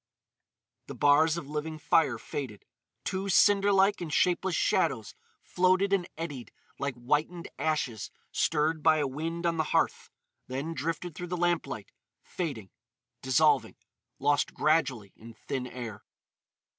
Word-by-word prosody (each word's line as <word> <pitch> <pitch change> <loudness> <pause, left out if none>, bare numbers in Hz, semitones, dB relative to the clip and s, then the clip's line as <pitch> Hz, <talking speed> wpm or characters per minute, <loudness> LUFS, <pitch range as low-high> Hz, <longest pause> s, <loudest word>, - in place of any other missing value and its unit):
The - - -7
bars 155 +3 +4
of 145 - -6
living 150 +2 -4
fire 150 -4 +2
faded. 115 -2 -6 0.4
Two 195 +1 -2
cinder 200 +1 +5
like 195 0 +3
and 165 -3 -4
shapeless 180 +2 +2
shadows 140 - +1 0.3
floated 185 +2 +2
and 185 -3 +1
eddied 145 -7 -6 0.3
like 140 -1 -2
whitened 150 +8 -1
ashes 140 -9 -1 0.2
stirred 155 0 +1
by 155 0 +5
a 150 - +1
wind 165 +5 -4
on 170 -1 +1
the 160 - +2
hearth; - - 0 0.4
then 140 +6 -4
drifted 165 +4 -3
through 180 +2 -6
the 180 +1 -3
lamp 175 -1 +1
light, 105 -2 -7 0.3
fading, 135 - -5 0.5
dissolving, 145 +2 +3 0.4
lost 145 +1 +1
gradually 135 -10 +1
in 115 0 -13
thin 125 +3 -4
air. 120 -5 -7
155 Hz, 135 wpm, -29 LUFS, 130-170 Hz, 0.5 s, cinder